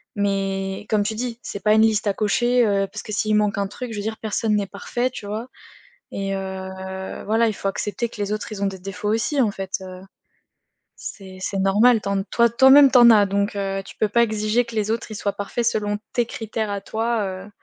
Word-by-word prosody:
mais, 195 -1 -1
comme 215 -2 +2
tu 220 +2 -3
dis: 240 0 -4
«C'est 200 - -7
pas 210 0 +4
une 220 - +5
liste 220 -1 +2
à 200 - +2
cocher», 240 +5 +2
heu, 200 -1 +2
parce - - -6
que 215 - -7
s'il 215 +1 +1
manque 210 0 +1
un 200 -1 0
truc 230 +3 -7
je - - -6
veux - - -2
dire 220 +1 -3
personne 220 0 -1
n'est 200 -2 0
parfait, 245 +6 -2
tu 245 - -9
vois? 220 +4 -4 0.6
Et 195 0 -3
heu, 190 0 -6
voilà, 225 +2 +2
il 220 - 0
faut 195 - -4
accepter 220 +5 -3
que 215 - -12
les 205 +1 -1
autres, 215 +1 -5
ils 200 -2 -6
ont - - +1
des 195 - -4
défauts 195 +2 -4
aussi 240 +5 +1
en 215 - +2
fait, 195 -2 -7
heu 185 -1 -9 1.1
c'est 190 -2 -12
c'est 195 +1 -3
normal, 215 +5 +4
tu 200 - -5
en 195 -1 0
toi 235 +2 +3
toi-même 265 +4 +7
tu 255 - +6
en 240 -1 +9
as 210 -2 +6
donc, 200 +1 -1
heu, 195 0 -2
tu - - -12
peux 215 - +1
pas 235 +3 +3
exiger 215 +2 0
que 235 -1 -10
les 215 -1 -1
autres, 225 +1 -2
ils - - -5
soient 200 -1 -2
parfaits 205 +4 -3
selon 210 -2 0
tes 240 -1 +1
critères 220 -1 -4
à 200 -1 -3
toi, 225 +2 -1 0.2
heu 205 - -12
210 Hz, 240 wpm, -22 LUFS, 195-225 Hz, 1.1 s, en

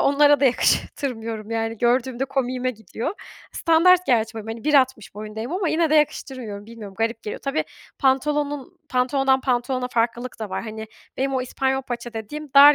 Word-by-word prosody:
onlara 290 +1 +5
da - - +4
yakıştırmıyorum 230 -3 0
yani, 225 -1 -2
gördüğümde 245 +1 +1
komiğime 255 -2 -1
gidiyor. 230 - -5 0.4
Standart 360 +2 +4
gerçi 225 -3 +2
böyle, 220 -1 -7
hani, 225 +3 -10
bir 300 -1 +2
altmış 260 -7 +2
boyundayım 215 +5 -6
ama 365 -2 0
yine 320 -1 +2
de - - +4
yakıştırmıyorum. 255 -8 -1
Bilmiyorum 220 -4 -10
garip 225 0 -1
geliyor. 210 - -5
Tabii, 280 +3 -1 0.3
pantolonun 290 +4 0
pantolonundan 265 +1 +2
pantolona 250 0 0
farklılık 240 +1 -1
da 215 - -4
var. - - -3
Hani, 220 -1 -6 0.3
benim 270 +1 0
o 255 - +1
İspanyol 265 +1 -1
paça 240 -1 -5
dediğim 280 +7 -6
dar 290 +1 +10
255 Hz, 165 wpm, -23 LUFS, 225-280 Hz, 0.4 s, dar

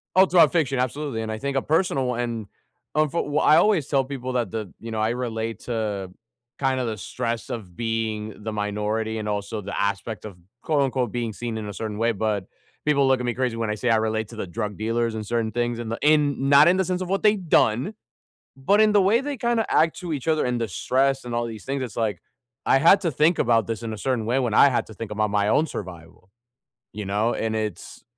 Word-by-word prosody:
All 190 +1 +7
throughout 170 -5 +5
fiction, 140 -6 +1
absolutely. 130 -2 -2
And 110 - -4
I 110 - -3
think 140 +1 -3
a 135 - +2
personal 155 -5 +1
one 120 -3 -2 0.5
I'm 155 0 +3
fro 170 - 0
Well, 145 +1 0
I 155 - +6
always 180 -6 +3
tell 135 -2 +1
people 130 -2 -5
that 120 -6 0
the 110 -5 -5
you 115 - -7
know, 110 -1 -2
I 110 +1 +1
relate 115 -3 -3
to 105 -5 -3 0.5
kinda 130 -2 0
the 110 -2 -3
stress 115 +2 -4
of 95 -7 -6
being 110 -2 -3
the 110 0 -4
minority 105 +2 -2
and 105 -1 -4
also 105 +1 -3
the 100 +1 -5
aspect 100 +2 -2
of 100 -4 -8 0.3
quote, 150 -3 +1
unquote 130 -4 -1
"being 120 -2 -2
seen 115 +1 -5
in 105 -2 -5
a - - -5
certain 110 -1 -5
way," 115 +1 +2
but 105 -2 -1 0.4
people 140 -2 +3
look 130 -1 +3
at 125 - -2
me 120 - -1
crazy 125 -3 -1
when 115 -2 -2
I - - 0
say 120 +2 -1
I 115 - +5
relate 110 0 -1
to 115 - -11
the 110 - -4
drug 105 +3 -4
dealers 115 +1 -1
and 110 -1 -4
certain 115 -1 -1
things 120 0 -1
in 115 -2 -5
the 115 - -3
in 145 -2 +3
not 145 +3 +7
in 180 - +4
the 190 - +1
sense 180 +1 -2
of 185 - -5
what 195 +1 0
they've 210 -4 +2
done, 125 - +3 0.6
but 195 +11 +3
in 215 -1 +5
the 205 -1 +5
way 215 +6 +4
they 285 0 -4
kinda 235 -2 0
act 160 0 +2
to 175 -3 -4
each 145 +2 -4
other, 155 -1 +2
and 125 -1 -1
the 115 - -1
stress, 135 +6 0
and 120 -1 -5
all 120 0 0
these 110 -2 -8
things. 135 0 -2
It's 120 -6 -6
like, 110 -5 -1 0.5
I 135 - +5
had 170 +7 +6
to 170 - +1
think 155 +5 +2
about 115 -3 +3
this 115 0 -4
in 115 - -4
a 110 - -6
certain 120 -2 -1
way 125 +3 +1
when 120 -4 0
I 140 - +7
had 125 - 0
to 110 - -11
think 110 +1 -7
about 105 0 0
my 105 0 +1
own 155 +8 +3
survival, 90 - -9 0.6
you 105 -1 -5
know? 105 +4 0
And 110 0 -2
it's 110 -1 -5
120 Hz, 245 wpm, -24 LUFS, 110-140 Hz, 0.6 s, All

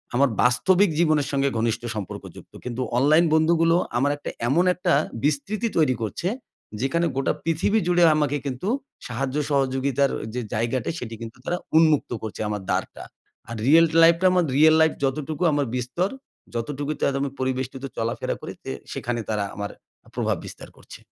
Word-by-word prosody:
আমার 140 +1 +4
বাস্তবিক 175 +11 +4
জীবনের 155 -4 +3
সঙ্গে 140 0 +1
ঘনিষ্ঠ 115 0 0
সম্পর্কযুক্ত। 105 -3 -8
কিন্তু 125 +1 -3 0.2
অনলাইন 155 +6 +5
বন্ধুগুলো 165 +1 +4 0.2
আমার 140 +3 +2
একটা - - -6 0.2
এমন 170 +8 +3
একটা 180 -1 0 0.3
বিস্তৃতি 195 +11 0
তৈরি 145 -6 +3
করছে। 115 - -3 0.5
যেখানে 170 +6 +1
গোটা 135 - +1
পৃথিবী 165 +7 +1
জুড়ে 175 -1 +4
আমাকে 145 -1 +1
কিন্তু 135 +8 -4 0.4
সাহায্য 130 +2 -3
সহযোগিতার 135 0 +1 0.2
যে 125 - -2
জায়গাটা, 120 +2 -1
সেটি 115 -2 -6
কিন্তু 115 +2 -8
তারা 175 - -1 0.2
উন্মুক্ত 155 -5 +3
করছে 110 -1 -6
আমার 105 -2 -3
দ্বারটা। - - -3 0.5
আর 115 - -5
রিয়াল 165 +3 +7 0.2
লাইফ 165 0 +7
টা - - +2
আমার 180 -2 +3
রিয়াল 155 +1 +6
লাইফ 160 - +5
যতটুকু 150 +4 -1
আমার 145 -1 +1
বিস্তর। 130 +10 -1 0.5
যতটুকুতে 145 +5 -3
আজ 135 - -3
আমি 140 - -1
পরিবেষ্টিত 130 +1 -3
চলাফেরা 115 +1 -2
করি। - - -6
যে - - -4 0.2
সেখানে 120 0 -3
তারা 105 -2 0
আমার 100 0 -4 0.4
প্রভাব - - 0
বিস্তার - - -10
করছে। - - -13
140 Hz, 160 wpm, -24 LUFS, 125-165 Hz, 0.5 s, রিয়াল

